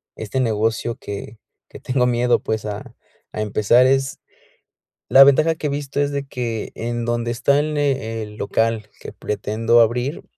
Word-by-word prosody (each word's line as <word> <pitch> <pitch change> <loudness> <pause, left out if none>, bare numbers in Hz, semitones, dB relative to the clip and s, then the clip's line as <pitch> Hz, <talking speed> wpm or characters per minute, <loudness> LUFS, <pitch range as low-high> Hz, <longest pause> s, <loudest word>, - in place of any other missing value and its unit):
este 110 +5 -4
negocio 115 0 0
que 100 +2 -8 0.3
que - - -11
tengo 125 -1 0
miedo, 120 0 +2
pues, 110 0 -3
a 105 -1 -7 0.4
a 110 - -4
empezar 110 +4 +3
es 135 0 0 0.9
la 135 +1 +9
ventaja 155 +4 +4
que 150 - -3
he - - -2
visto 140 0 -3
es 145 0 +1
de 140 -1 -3
que 120 -4 -4
en 120 0 -3
donde 120 0 -1
está 140 +4 +2
el 155 +1 -2
ne 135 -6 -1
el 105 0 -9
local 110 +1 -1
que - - -9
pretendo 110 +3 +1
abrir, 125 +6 0
120 Hz, 170 wpm, -21 LUFS, 110-135 Hz, 0.9 s, la